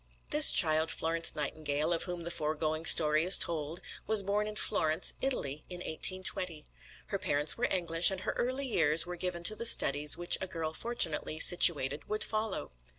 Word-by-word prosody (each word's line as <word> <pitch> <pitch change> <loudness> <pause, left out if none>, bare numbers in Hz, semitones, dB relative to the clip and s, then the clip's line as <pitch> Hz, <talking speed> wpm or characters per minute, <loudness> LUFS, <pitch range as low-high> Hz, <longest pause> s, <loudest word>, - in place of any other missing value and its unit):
This 300 0 +8
child, 160 -2 +1
Florence 165 +1 -1
Nightingale, 150 +1 -4
of 165 - -3
whom 175 -2 -7
the 170 - -7
foregoing 155 0 -3
story 155 0 +5
is 185 +3 +7
told, 160 0 -3 0.3
was 215 -1 +2
born 205 +2 -3
in 215 - -8
Florence, 160 -7 -3
Italy, 150 - -5
in 180 - -8
1820. 180 -1 -2 0.4
Her 200 - -6
parents 150 -2 +1
were 245 - -3
English, 170 -2 +2
and 190 -1 -6
her - - -4
early 260 +3 -4
years 165 - 0
were 180 0 -8
given 175 -1 -6
to 215 +5 0
the 225 - -6
studies 145 -7 +1
which 175 0 -1
a 190 - -4
girl 160 -3 -6
fortunately 165 -8 -1
situated 150 -4 +4
would 215 0 -2
follow. 215 - -5
170 Hz, 175 wpm, -29 LUFS, 155-190 Hz, 0.4 s, This